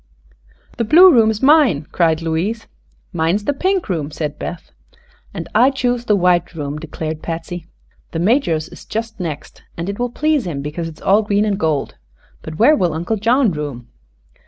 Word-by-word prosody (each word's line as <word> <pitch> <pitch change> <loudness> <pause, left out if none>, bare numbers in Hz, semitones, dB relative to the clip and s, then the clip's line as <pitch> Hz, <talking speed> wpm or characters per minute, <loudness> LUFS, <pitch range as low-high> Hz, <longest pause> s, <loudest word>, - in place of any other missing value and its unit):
"The 235 - 0
blue 345 +10 +7
room 225 -3 +5
is 220 +2 -3
mine!" 265 - +4
cried 165 -2 +1
Louise. 190 +8 -2 0.5
"Mine 165 +1 +1
is 205 0 -3
the 285 - +1
pink 375 +5 0
room," 160 -7 -2
said 150 -1 -5
Beth. 175 - -7 0.6
"And - - -6
I 255 - +5
choose 245 -3 -1
the 210 - +3
white 175 -2 +1
room," 145 -1 -4
declared 155 0 -6
Patsy. 165 +1 -6 0.4
"The - - -5
Major's 170 - +1
is - - -13
just 225 0 -5
next, 160 -5 -6 0.2
and 170 +3 -4
it 200 - -5
will 245 0 -1
please 300 -2 0
him 140 -5 -4
because 160 +3 -4
it 160 -2 -10
is - - -16
all 200 +3 +4
green 205 0 +1
and 205 -2 -1
gold. 150 - -1 0.4
But 155 - -8
where 280 +8 +5
will 175 - 0
Uncle 175 +7 -2
John 235 +2 +2
room?" 140 -6 -6
180 Hz, 185 wpm, -18 LUFS, 160-230 Hz, 0.6 s, blue